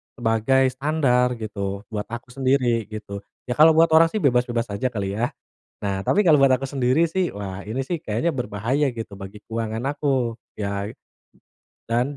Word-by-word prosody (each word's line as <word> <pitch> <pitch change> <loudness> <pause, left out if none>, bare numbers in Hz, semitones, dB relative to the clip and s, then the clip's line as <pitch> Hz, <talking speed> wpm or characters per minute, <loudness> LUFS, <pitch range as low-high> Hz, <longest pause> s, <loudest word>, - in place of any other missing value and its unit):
sebagai 120 +3 +2
standar 130 -3 +1
gitu, 100 -2 -4
buat 105 -1 -4
aku 120 +2 -8
sendiri, 125 -4 +1
gitu. 105 -2 -7 0.3
Ya, 125 - -1
kalau 160 +1 +9
buat 165 0 +5
orang 165 +1 +7
sih 215 +6 -3
bebas-bebas 120 -4 +1
aja, 100 +6 -1
kali, 100 -3 -3
ya? 125 +5 -1 0.4
Nah, 100 -1 -2
tapi 205 - +2
kalau 150 -4 +6
buat 135 - +6
aku 130 +1 +2
sendiri 135 +4 +2
sih, 180 +2 -1
wah, 100 -1 -6
ini 130 +5 -4
sih 170 -4 -3
kayaknya 120 +10 -1
berbahaya 125 +4 0
gitu, 115 -4 -7
bagi 95 +2 -9
keuangan 115 0 -3
aku. 130 -6 0 0.2
Ya 100 0 -3 0.9
dan 125 +5 -1
120 Hz, 170 wpm, -23 LUFS, 105-135 Hz, 0.9 s, kalau